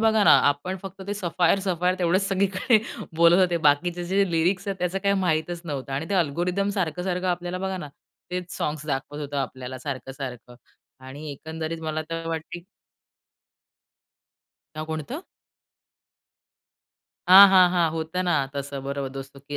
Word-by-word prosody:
बघा 220 -1 +3
ना, - - +7 0.2
आपण 160 +7 -2
फक्त 195 0 -9
ते 205 - -2
सफायर-सफायर 180 0 +1
तेवढेच 180 +2 +2
सगळीकडे 195 +4 +2 0.4
बोलत 170 +2 +6
होते. 175 -2 +3
बाकीचे 170 +3 +2
जे 195 +1 +1
लिरिक्स 180 +4 +1
आहेत 195 -1 -3
त्याचं 180 +2 -1
काही 200 0 +1
माहीतच 170 0 0
नव्हतं 140 -3 -5
आणि 145 +4 -3
ते - - +1
अल्गोरिदम 180 +4 0
सारखं-सारखं 180 +1 -2
आपल्याला 175 +1 -2
बघा 190 0 -3
ना, 150 -3 -7 0.4
तेच 180 -1 -5
सॉन्ग्स 150 0 -3
दाखवत 145 0 -3
होतं 145 -1 -5
आपल्याला 130 -1 -4
सारखं-सारखं 130 -2 -7 0.5
आणि 145 +3 -8
एकंदरीत 160 +3 -6
मला 155 0 -2
तर 165 0 -4
वाटते 165 +1 -5 2.1
नाव 155 - -3
कोणतं? 160 - -5 2.1
हां, 195 +2 +11
हां, 185 -1 +7
हां, 175 -2 +3
होतं 165 +3 -2
ना. 155 -6 +1
तसं 140 -1 -5
बरोबर 140 0 -3
दोस्तों 135 +1 -9
की 145 +1 -6
170 Hz, 145 wpm, -25 LUFS, 145-185 Hz, 2.1 s, हां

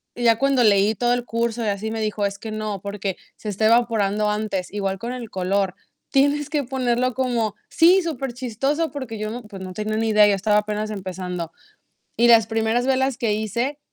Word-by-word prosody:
ya 230 -2 +3
cuando 275 -2 +3
leí 205 0 +4
todo 240 +2 +1
el 245 -1 -1
curso, 230 0 -1
y - - -1
así, 205 +2 -2
me 225 -1 -3
dijo: 215 -1 -1
"Es 200 0 -2
que 220 - -6
no, 215 -3 -4
porque 200 -2 -4 0.2
se - - -10
está 210 +2 0
evaporando 215 -3 +2
antes". 210 -4 -2
Igual 195 -2 -2
con 240 +2 -4
el 240 -4 -7
color, 190 0 -1 0.4
tienes 285 +2 +2
que 295 -3 0
ponerlo 250 -1 0
como 235 -5 -1
Sí, 355 +3 +5
súper 270 -7 -4
chistoso, 270 +6 -1
porque 260 -6 -6
yo 215 0 -3
no 245 0 -6
pues, 200 -3 -10
no 185 -1 -7
tenía 215 +1 -3
ni 225 0 0
idea, 210 -1 +6
yo 200 - +3
estaba 210 +2 +2
apenas 210 0 -3
empezando. 180 -3 -5 0.7
Y 240 +1 +4
las 225 -2 +7
primeras 225 +2 0
velas 265 -1 +1
que 230 -5 0
hice, 235 +7 -2
220 Hz, 205 wpm, -22 LUFS, 205-245 Hz, 0.7 s, las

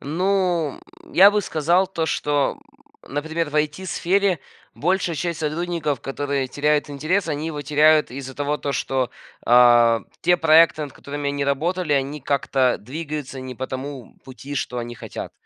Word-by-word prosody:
Ну, 175 -1 0 0.3
м, - - -18
я 195 +3 +8
бы 210 0 +1
сказал 175 +1 +1
то, 165 -4 -3
что, 145 - 0 0.5
м, - - -12
например, 160 +2 -2
в - - -12
IT-сфере 180 +4 0 0.3
большая 175 0 0
часть 170 0 -3
сотрудников, 155 -3 -2
которые 140 -1 -2
теряют 150 +1 0
интерес, 160 +7 -1
они 150 0 -2
его 150 -3 -4
теряют 150 +1 +4
из-за 130 0 -7
того, 145 +1 -2
то 140 - -3
что, 130 -1 -1 0.4
а, 120 -1 +6 0.2
те 175 +1 +3
проекты, 160 -1 +5
над 145 -3 -6
которыми 145 0 -5
они 140 0 -2
работали, 160 +4 0
они 140 +2 -1
как-то 130 -2 +1
двигаются 145 +1 -6
не 130 0 -7
по 130 +2 -5
тому 130 -2 -7
пути, 135 +2 -9
что 125 -2 -3
они 120 0 -5
хотят. - - -8
150 Hz, 160 wpm, -22 LUFS, 135-165 Hz, 0.5 s, я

